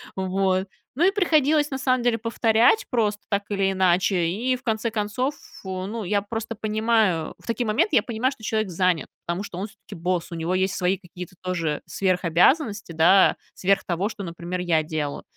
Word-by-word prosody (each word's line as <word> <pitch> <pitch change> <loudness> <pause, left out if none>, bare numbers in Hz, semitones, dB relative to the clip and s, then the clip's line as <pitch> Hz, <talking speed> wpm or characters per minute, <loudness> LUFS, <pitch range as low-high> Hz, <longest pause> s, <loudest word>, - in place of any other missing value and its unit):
Вот. 190 0 0 0.3
Ну, 335 +6 +3
и - - +4
приходилось, 310 -6 +3
на 265 - -3
самом 255 -2 +1
деле, 240 -2 +2
повторять 230 - +3
просто 210 -4 0
так 200 -1 0
или 195 -1 +1
иначе. 185 -1 +2
И 245 +8 0
в - - -21
конце 225 0 -1
концов, 230 +7 -1
ф - - -16
ну 190 +4 -4
я 200 +2 +1
просто 225 +2 -5
понимаю, 215 -6 +1
в - - -19
такие 230 +1 -1
моменты 265 - +1
я 220 - +5
понимаю, 245 +4 -1
что 220 - -19
человек 215 -2 -1
занят, 180 -2 +1 0.2
потому 175 +4 -2
что 175 - -8
он 200 +3 -3
всё-таки 210 -1 -13
босс, 175 +1 -2
у - - -4
него 165 +2 -2
есть 190 +1 +1
свои 185 +1 +1
какие-то 180 0 -10
тоже, 180 -4 -2
э, - - -11
сверхобязанности, 190 - +1
да 165 +4 +5 0.2
сверх 195 +1 +1
того, 185 +4 -1
что, 205 -3 -7
например, 170 +1 -5
я 165 -3 +1
делаю, 155 -2 -4
200 Hz, 190 wpm, -24 LUFS, 180-230 Hz, 0.3 s, я